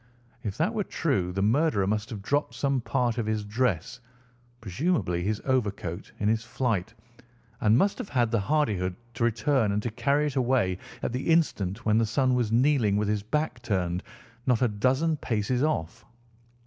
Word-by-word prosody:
If 100 -3 -4
that 180 +8 +1
were 215 -2 0
true 100 - -1
the 95 +2 -1
murderer 115 -2 +2
must 105 +2 -1
have 105 -5 -7
dropped 145 +7 0
some 135 -2 0
part 120 0 0
of 110 - -2
his 110 -1 -1
dress, 110 0 -1 0.6
presumably 110 - -1
his 105 +3 -2
overcoat, 100 -10 -2
in 105 - 0
his 110 +1 +1
flight, 115 -4 -2 0.6
and 110 +1 +4
must 195 +8 +2
have - - -5
had 120 -4 +1
the 115 - +2
hardihood 100 -7 0 0.2
to 115 - -2
return 115 0 +2
and 105 - +1
to 120 - -2
carry 140 +6 +1
it 145 -2 -3
away 120 -8 +1 0.2
at - - -1
the 125 - -3
instant 115 - +1
when 110 0 +4
the 115 - +3
son 130 +3 +2
was 120 -3 +1
kneeling 120 -4 +3
with 105 0 0
his 105 -1 0
back 125 +3 -2
turned 90 -6 -1 0.5
not 125 -1 +3
a - - +5
dozen 130 +9 +1
paces 120 0 -1
off. 145 - -1
115 Hz, 180 wpm, -27 LUFS, 105-135 Hz, 0.6 s, a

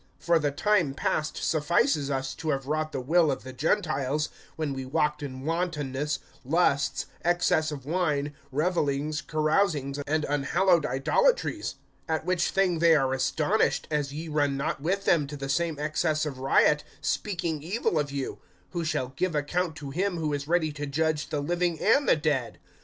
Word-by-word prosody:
(3)For 170 -2 +2
the 145 - +2
time 170 -2 +1
past 155 +2 -1
suffices 155 - +1
us 135 -1 -2
to 160 - -5
have 135 -2 -1
wrought 155 +2 -1
the 135 - -3
will 160 +5 +3
of 135 - -4
the 130 - -8
Gentiles, 150 -1 0 0.3
when 155 -3 -2
we 135 0 -4
walked 150 +2 0
in 130 -2 -6
wantonness, 150 -4 -1 0.3
lusts, 140 -1 +1 0.2
excess 175 -2 +2
of 140 -3 -7
wine, 150 -3 0 0.2
revelings, 150 -1 0
carousings, 155 -3 0
and 155 +1 +1
unhallowed 150 +3 +2
idolatries; 485 - +1 0.3
(4)at 160 -1 0
which 180 -1 +1
thing 185 -4 +1
they 165 -1 +6
are 135 -3 +2
astonished, 150 +10 +1
as 145 -2 0
ye 155 +3 -6
run 145 -3 +1
not 140 0 -2
with 195 +6 -1
them 150 -4 +3
to 145 +1 -7
the 135 0 -5
same 165 +2 0
excess 155 +1 0
of 135 -4 -5
riot, 135 +2 +3 0.2
speaking 175 -6 -2
evil 175 -1 0
of 145 -2 -2
you; 140 -1 -4 0.3
(5)who 170 -2 -1
shall 130 -5 -1
give 185 0 -1
account 160 +3 -1
to 145 -3 -7
him 185 +4 -1
who 155 -2 -1
is 140 0 -3
ready 165 -2 +2
to 145 0 -5
judge 155 +1 0
the 150 - -1
living 175 +2 0
and 275 +7 +3
the - - +6
dead. 145 -6 -1
155 Hz, 175 wpm, -27 LUFS, 140-170 Hz, 0.3 s, they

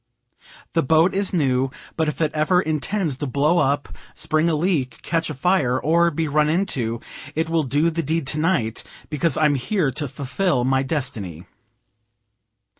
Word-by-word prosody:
The - - +3
boat 160 +6 +3
is 200 0 -1
new, 135 -6 +1 0.3
but 160 -1 0
if 150 - -3
it 155 -2 +2
ever 155 +4 +2
intends 155 -1 -1
to 145 - -3
blow 150 +6 +2
up, 145 0 0 0.2
spring 155 +2 +1
a 160 - +1
leak, 150 -8 0
catch 165 -1 -1
afire, 140 -4 +1
or 170 +2 +3
be 160 0 -2
run 150 +1 +2
into, 135 - -1 0.4
it 160 +1 -1
will 165 -1 +3
do 150 +4 +1
the 165 +1 -1
deed 160 0 -1
tonight, 150 -6 0 0.3
because 150 0 +1
I'm 150 -2 +3
here 145 +3 0
to 145 +4 -3
fulfill 140 +2 -1
my 130 +1 +2
destiny. 110 - -4
155 Hz, 160 wpm, -22 LUFS, 135-165 Hz, 0.4 s, The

